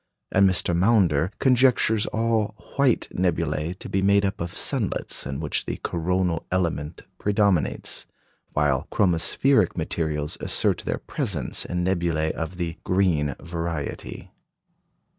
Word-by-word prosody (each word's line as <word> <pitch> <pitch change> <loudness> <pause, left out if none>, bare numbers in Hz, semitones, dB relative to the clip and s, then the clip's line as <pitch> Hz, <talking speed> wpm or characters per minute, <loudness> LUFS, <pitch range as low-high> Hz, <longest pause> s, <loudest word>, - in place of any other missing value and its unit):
And 95 0 +5
Mr. 90 -1 +1
Maunder 90 -4 +3
conjectures 125 -4 +3
all 110 -2 0 0.2
"white" 140 -4 +2
nebulæ 85 -1 -1
to - - -8
be 95 - 0
made 100 +1 +4
up 95 -2 -3
of 85 - -5
sunlets - - -1
in 70 0 -4
which - - -1
the - - -3
coronal 90 0 -1
element 85 -4 -2 0.2
predominates, 100 -5 0 0.5
while 75 -3 +1
chromospheric 95 +5 +3
materials 75 -2 -2
assert - - +1
their - - -1
presence - - -2
in 90 0 -2
nebulæ 85 -4 0
of 80 +2 -5
the 85 -1 -4
"green" 85 -7 +1
variety. 85 -2 -5
90 Hz, 120 wpm, -24 LUFS, 80-100 Hz, 0.5 s, And